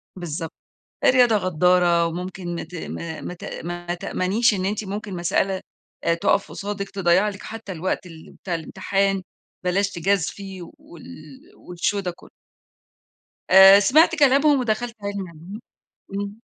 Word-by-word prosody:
بالضبط، 165 -2 -5 0.5
الرياضة 245 -3 +5
غدارّة 180 -2 +3
وممكن 175 0 -5
ت - - -12
ما 165 -1 -6
ما - - -6
ت 175 - -12 0.2
ما 175 0 -4
تأمنيش 205 +6 +1
إن 185 -1 -2
أنتِ 210 +2 -2
ممكن 200 0 -5
مسألة 190 +2 0 0.4
آآ، 170 - +3
تُقَف 170 +4 +1
قصادِك، 200 -1 -5
تضيّع 190 +1 +2
لِك 200 -1 -7
حتّى 225 -3 -7
الوقت 185 +2 -3
ال 160 -2 -13
بتاع 180 - -5
الامتحان، 195 +4 -1 0.4
بلاش 195 +2 +1
تجازفي 195 +1 -2
وال 170 -1 -14 0.7
والshow 190 +4 0
ده 185 -2 -3
كلّه. - - -17 1.2
آآ، 190 +1 +9
سمعت 310 +10 +4
كلامهم 285 0 +4
ودخلت 235 0 -2
عِلمي 200 -2 -4
علوم 170 +6 -10 0.5
إمم. 200 +3 -5
190 Hz, 135 wpm, -23 LUFS, 175-205 Hz, 1.2 s, آآ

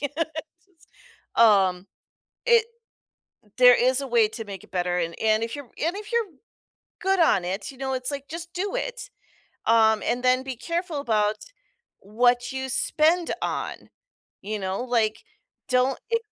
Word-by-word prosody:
yes, 285 0 -3 1.2
um, 195 -5 +4 0.6
it 470 -2 +5 0.9
there 250 -1 +8
is 255 +2 +2
a 275 - -4
way 235 -3 +3
to 225 +1 -7
make 195 -3 -9
it - - -19
better, 180 -1 -1
and 170 -1 -2
and 220 0 +2
if 230 +5 -3
you're 285 - -7
and 335 +9 -3
if 425 +3 -8
you're 470 -2 +2 0.7
good 385 -1 +1
on 200 - +4
it, 190 +3 -4
you 265 - -15
know, 265 -1 -3
it's 255 +1 -1
like 280 -1 -6
just 335 +1 -6
do 390 +4 -3
it, - - -4 0.6
um, 220 -1 +4
and 245 +1 -1
then 255 +1 +3
be 265 -1 -5
careful 335 +4 -3
about 215 -5 +1 0.6
what 245 +5 +1
you 265 0 -4
spend 320 +6 +2
on, - - -4 0.5
you 210 +2 -4
know, 190 +2 -3
like, 225 -3 0 0.5
don't 255 +1 +2
e 460 - +4
250 Hz, 160 wpm, -25 LUFS, 215-305 Hz, 1.2 s, there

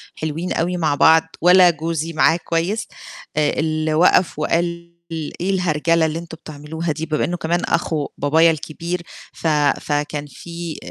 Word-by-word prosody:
حلوين 160 +3 -3
أوي 180 +2 -1
مع 155 -4 +1
بعض 160 +2 +6 0.2
ولا، 180 +1 +7
جوزي 165 0 -3
معاه 160 +2 +3
كويس، 175 +6 -1 0.5
آآ 150 -1 +2
اللي 155 0 0
وقف 170 0 +3
وقال: 170 +1 -1 0.5
"إيه 185 +3 -2
الهرجلة 165 -3 +1
اللي 160 +1 -2
أنتم 165 -1 -10
بتعملوها 155 +2 -5
دي؟" 160 +2 -4
بما 155 -1 0
إنه 175 0 -3
كمان، 170 +2 -1
أخو 160 -3 -1
بابايا 160 +4 +4
الكبير 165 +3 -4 0.3
ف - - -4 0.3
فكان 145 0 -2
في 170 +1 -7
165 Hz, 150 wpm, -20 LUFS, 155-170 Hz, 0.5 s, ولا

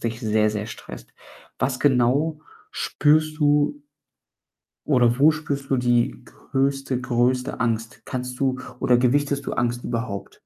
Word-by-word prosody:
dich 115 0 -3
sehr, 110 -2 +2
sehr 105 0 -4
stresst. - - -10 0.5
Was 130 -1 0
genau 145 +4 +2 0.3
spürst 155 +1 +1
du 145 -1 +2 1.0
oder 125 -3 +3
wo 155 +3 +7
spürst 145 -3 -4
du 135 - +3
die 120 - +1
größte 135 -1 -2
größte 125 +1 0
Angst? 115 -1 -2
Kannst 125 0 -5
du 130 -2 0 0.2
oder 125 - +3
gewichtest 140 +3 +1
du - - -1
Angst 120 0 -1
überhaupt? 115 -5 -4
125 Hz, 130 wpm, -23 LUFS, 120-145 Hz, 1.0 s, wo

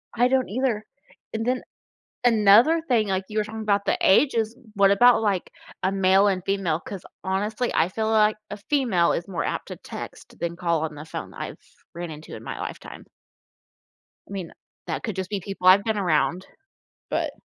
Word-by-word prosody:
I 245 +2 +4
don't 260 -3 +1
either. 235 -2 -1 0.5
And 225 +1 -2
then 255 +1 0 0.6
another 230 +8 +6
thing, 225 -4 +2
like, 190 0 -1
you 215 0 -3
were 210 - +2
talking 220 +1 -7
about 200 -1 +1
the - - +2
ages, 225 +1 +3 0.2
what 200 -1 +5
about, 240 +3 +5
like, 200 -4 0 0.3
a 190 +1 +1
male 195 +1 +4
and 185 -2 0
female, 190 -5 0
'cause, 195 -3 -8 0.2
honestly, 210 +6 -1
I 165 - +3
feel 220 +3 -2
like 215 -1 +4
a 205 - -4
female 230 -12 +3
is 170 - -3
more 185 - -3
apt - - -3
to - - -7
text - - -10
than 170 0 -3
call 170 -3 0
on 155 - -4
the 150 - -8
phone, 160 - -7
I've - - -6 0.4
ran 170 -1 -5
into 155 +1 -9
in - - -10
my - - -5
lifetime. - - -8 1.2
I - - -16
mean, 185 -4 -5 0.4
that - - -3
could 215 -5 -3
just 190 0 -4
be 205 - -2
people 195 -1 -3
I've 195 +2 +8
been 220 0 -1
around. 180 0 +1 0.6
But - - -1
200 Hz, 190 wpm, -24 LUFS, 185-220 Hz, 1.2 s, I've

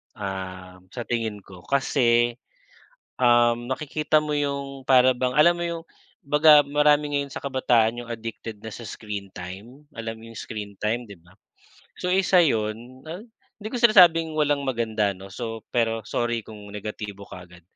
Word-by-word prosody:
um, 95 -2 -6
sa 120 - -5
tingin 110 -4 -3
ko 90 -2 -13
kasi, 120 -3 +2 0.8
um, 120 0 +3
nakikita 150 +2 0
mo 150 -1 -2
'yong 140 -1 -3
para 130 -1 +5
bang 125 0 0
alam 170 +3 +6
mo 175 - -3
'yong 170 -1 -5 0.4
baga 150 0 +6
marami 145 0 +2
ngayon 140 -1 -1
sa - - -6
kabataan 120 -4 +1
'yong 120 - -12
addicted 115 -1 -6
na 110 - -7
sa - - -9
screen 105 -3 -7
time, 105 +11 -10
alam 115 -2 -6
mo 115 - -13
'yong 115 - -13
screen 105 -2 -7
time, 115 +3 -1
'di 100 -4 -12
ba. 90 +3 -22 0.7
So 180 - -1
isa 185 -1 +4
'yon, 120 -1 -2
ah, 170 +5 -7 0.4
hindi 210 - -5
ko 245 - -4
sinasabing 175 -9 +6
walang 145 -2 +1
maganda 110 -5 0
'no. 95 +1 -12
So 115 +2 -6
pero 115 -2 0
sorry 120 -1 -1
kung 105 -2 -12
negatibo 105 -1 -6
kaagad. 90 -1 -12
120 Hz, 160 wpm, -24 LUFS, 110-145 Hz, 0.8 s, alam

